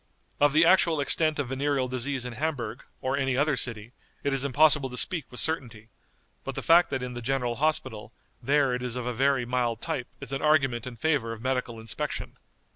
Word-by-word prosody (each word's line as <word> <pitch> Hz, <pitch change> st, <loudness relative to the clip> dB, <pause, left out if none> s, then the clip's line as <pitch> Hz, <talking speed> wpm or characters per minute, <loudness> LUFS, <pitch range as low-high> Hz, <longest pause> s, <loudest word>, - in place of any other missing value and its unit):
Of 145 Hz, -1 st, +4 dB
the 160 Hz, +2 st, +5 dB
actual 170 Hz, -3 st, +4 dB
extent 155 Hz, +2 st, +2 dB
of 140 Hz, -4 st, -2 dB
venereal 135 Hz, 0 st, 0 dB
disease 130 Hz, +1 st, -2 dB
in 125 Hz, -, -5 dB
Hamburg, 125 Hz, -3 st, -3 dB, 0.2 s
or 130 Hz, +1 st, -1 dB
any 135 Hz, -2 st, 0 dB
other 145 Hz, 0 st, +2 dB
city, 115 Hz, -3 st, -2 dB, 0.3 s
it 140 Hz, -, 0 dB
is 135 Hz, -1 st, +2 dB
impossible 140 Hz, 0 st, +3 dB
to 125 Hz, -, -8 dB
speak 165 Hz, +2 st, +1 dB
with 125 Hz, -, -7 dB
certainty, 115 Hz, -8 st, -2 dB, 0.5 s
but -, -, -5 dB
the -, -, -4 dB
fact 170 Hz, +2 st, +5 dB
that 130 Hz, -2 st, -3 dB
in 125 Hz, 0 st, -5 dB
the 120 Hz, -, -6 dB
general 125 Hz, -1 st, -1 dB
hospital 130 Hz, -7 st, -1 dB, 0.3 s
there 140 Hz, +1 st, +2 dB
it 125 Hz, -, -2 dB
is 125 Hz, -1 st, -3 dB
of 125 Hz, -1 st, -4 dB
a 125 Hz, -, -2 dB
very 135 Hz, +1 st, +1 dB
mild 120 Hz, -2 st, -1 dB
type 125 Hz, +1 st, -3 dB
is -, -, -7 dB
an 135 Hz, -, -2 dB
argument 135 Hz, -6 st, +2 dB
in 125 Hz, -, -7 dB
favor 125 Hz, -3 st, 0 dB
of 110 Hz, -, -10 dB
medical 125 Hz, -3 st, -2 dB
inspection. 115 Hz, +6 st, -4 dB
130 Hz, 205 wpm, -27 LUFS, 120-145 Hz, 0.5 s, the